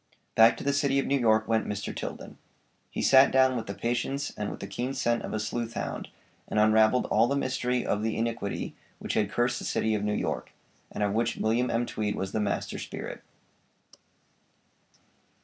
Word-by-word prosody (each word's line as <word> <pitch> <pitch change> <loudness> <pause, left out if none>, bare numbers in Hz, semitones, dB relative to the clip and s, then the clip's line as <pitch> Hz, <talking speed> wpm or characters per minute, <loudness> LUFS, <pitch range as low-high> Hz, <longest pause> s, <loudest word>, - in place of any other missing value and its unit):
Back 115 +1 +6
to - - -7
the 140 - +1
City 140 -1 +2
of 135 - +1
New 140 0 +1
York 110 -2 +3
went 110 0 +1
Mr. 105 -1 -4
Tilden. - - -7 0.5
He - - -3
sat 135 0 +7
down 130 -1 +4
with 115 -2 -4
the 100 - -5
patience 120 +6 -2
and 105 -1 -3
with - - -7
the - - -5
keen 120 +7 -4
scent 120 -3 +1
of - - -6
a 110 - -2
sleuth 115 +2 -3
hound, - - -4 0.4
and 105 - 0
unravelled 110 +3 +4
all 110 +2 +4
the 140 - 0
mystery 125 -2 -1
of 105 - 0
the 110 0 -1
iniquity 115 -3 -2 0.2
which - - -4
had 105 -2 +1
cursed 120 0 +1
the - - -7
City 110 - 0
of 105 -1 -1
New 105 0 0
York, - - -3 0.4
and - - -2
of 100 -1 +1
which 115 +1 0
William 120 +3 +1
M. 115 +1 0
Tweed 105 -3 -2
was 95 0 -3
the 110 - -1
master 105 -1 -2
spirit. - - -6
115 Hz, 200 wpm, -28 LUFS, 110-125 Hz, 0.5 s, sat